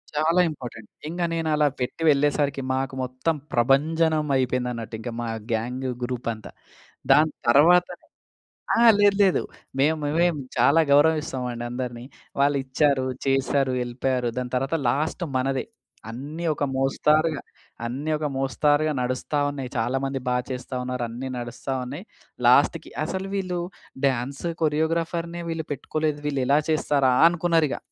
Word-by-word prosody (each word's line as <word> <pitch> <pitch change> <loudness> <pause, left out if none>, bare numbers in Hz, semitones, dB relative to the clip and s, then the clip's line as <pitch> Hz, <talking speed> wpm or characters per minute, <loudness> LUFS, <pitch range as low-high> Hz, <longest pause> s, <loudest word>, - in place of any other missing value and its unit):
చాలా 165 +4 +3
ఇంపార్టెంట్. 120 -7 -9 0.2
ఇంగ 175 +2 -4
నేను 160 -1 -1
అలా 150 0 +3
పెట్టి 125 +6 -3
వెళ్ళేసరికి, 145 -1 +2
మాకు 130 0 -2
మొత్తం 130 +6 -1 0.2
ప్రభంజనం 155 +5 +2
అయిపోయింది 125 -1 0
అన్నట్టు, 115 -1 -6
ఇంక 120 - -5
మా 120 - -3 0.2
గ్యాంగ్ 125 +4 -2 0.2
గ్రూప్ 120 -1 -4
అంతా. 110 - -11 0.6
దాని 150 +2 +5 0.2
తర్వాతనె 175 +7 +4 0.7
ఆ! - - +1 0.2
లేదు, 205 -1 +5
లేదు. 190 - +3 0.4
మేము 155 +3 +3
మేమే 160 +4 +2 0.3
చాలా 140 +6 +4
గౌరవిస్తామండి 140 -5 +2
అందరిని. 120 -1 -5 0.4
వాళ్ళు 140 0 +3
ఇచ్చారు. 135 0 +1 0.2
చేశారు. 135 0 +1
ఎళ్ళిపోయారు. 125 0 -1
దాని 125 -1 -3
తర్వాత 135 +5 0
లాస్ట్ 155 +7 -1
మనదే. 130 +1 0 0.5
అన్నీ 145 +8 -6
ఒక 145 - -3
మోస్తారుగా 150 +3 +2 0.4
అన్నీ 140 +6 -3
ఒక 150 - -3
మోస్తారుగా 145 +3 +1
నడుస్తా 130 +4 -1
ఉన్నాయి. 135 -3 -5
చాలామంది 135 +3 -1
బా 125 - +2
చేస్తా 130 0 -5
ఉన్నారు. 125 -1 -3
అన్నీ 125 +3 -6
నడుస్తా 120 +3 -5
ఉన్నాయి. 145 - -7 0.4
లాస్ట్‌కి - - +4
అసలు 190 +1 -4
వీళ్ళు 180 -2 -2 0.5
డాన్స్ 135 +4 -2 0.2
కొరియోగ్రాఫర్‌నే 165 +2 -1
వీళ్ళు 165 -1 -3
పెట్టుకోలేదు. 150 +2 -2
వీళ్ళు 140 -2 -1
ఎలా 145 +2 +4
చేస్తారా! 140 -4 +2 0.2
అనుకున్నారు 170 -2 +2
ఇగ. - - -2
140 Hz, 135 wpm, -24 LUFS, 125-155 Hz, 0.7 s, దాని